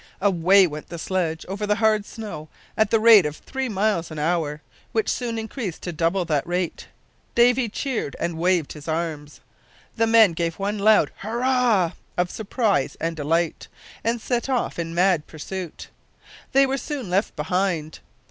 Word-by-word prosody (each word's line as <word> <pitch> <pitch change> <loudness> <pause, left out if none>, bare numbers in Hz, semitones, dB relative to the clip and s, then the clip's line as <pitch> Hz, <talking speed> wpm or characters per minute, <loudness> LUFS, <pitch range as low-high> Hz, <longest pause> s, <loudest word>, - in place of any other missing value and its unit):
Away 190 0 +5
went 150 -3 -6
the 170 - -6
sledge 165 -2 -2
over 200 +3 -3
the 210 - +2
hard 215 -1 +2
snow 205 -9 -8 0.3
at 220 -2 +2
the 225 - +3
rate 220 -3 +8
of 150 - -6
three 265 -1 -4
miles 200 -4 0
an 155 - -8
hour, 155 -1 -1 0.3
which 220 -1 +1
soon 235 -2 -2
increased 220 - -5
to 175 - -3
double 170 +3 0
that 150 -3 0
rate. 175 -1 -2 0.5
Davy 240 0 +4
cheered 240 - -3
and 170 -1 -2
waved 175 -3 +1
his 150 0 -11
arms. 155 -2 -4 0.6
The 225 0 +3
men 225 -5 +6
gave 165 0 -2
one 205 +1 -2
loud 215 +1 +4
"hurrah" 235 -4 +1 0.3
of 180 0 0
surprise 220 -1 0
and 165 0 -2
delight, 165 +2 -1 0.4
and 230 +1 0
set 240 +3 -2
off 250 -8 -1
in 165 0 -4
mad 180 -3 +2
pursuit. 175 +2 -7 0.6
They 275 +1 +5
were 270 +1 -1
soon 280 -7 -5
left 195 +4 0
behind. 160 -1 -1
190 Hz, 165 wpm, -23 LUFS, 165-225 Hz, 0.6 s, rate